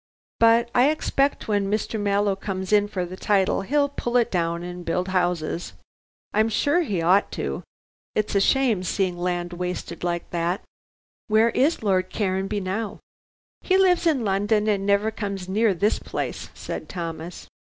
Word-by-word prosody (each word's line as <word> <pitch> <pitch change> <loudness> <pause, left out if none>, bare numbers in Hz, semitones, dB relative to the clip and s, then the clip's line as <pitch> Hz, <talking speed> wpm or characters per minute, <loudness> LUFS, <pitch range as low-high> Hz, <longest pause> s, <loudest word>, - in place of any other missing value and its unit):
But 230 +1 +4
I 250 +3 +5
expect 285 -2 0
when 205 -2 +1
Mr. 215 +1 -1
Mallow 200 -1 +1
comes 190 0 -4
in 205 0 +4
for 190 -4 -3
the 180 +1 -8
title 195 0 +1
he'll 285 +8 +2
pull 245 -3 -1
it 240 -1 +2
down 170 -1 -1
and 180 0 -7
build 180 +2 -1
'ouses. 175 -2 -1 0.6
I'm 220 +2 +3
sure 290 - +2
he 195 - -1
ought 185 +4 +3
to: - - -3 0.5
it's 215 -1 0
a 200 - +3
shame 245 -4 +3
seeing 185 0 -1
land 175 0 -2
wasted 180 -1 -5
like 175 -1 -2
that." 175 +2 -1 0.6
"Where 220 +2 +4
is 280 +1 +1
Lord 185 -3 +1
Caranby 195 0 -1
now?" 200 +4 -3 0.6
"He 375 - +2
lives 360 -2 +4
in 275 -8 +2
London 205 +2 +1
and 200 -2 +1
never 205 +2 +2
comes 200 -4 -5
near 215 +3 +2
this 200 +4 +1
place," - - -5
said - - -6
Thomas. 165 -1 -6
200 Hz, 160 wpm, -24 LUFS, 180-225 Hz, 0.6 s, I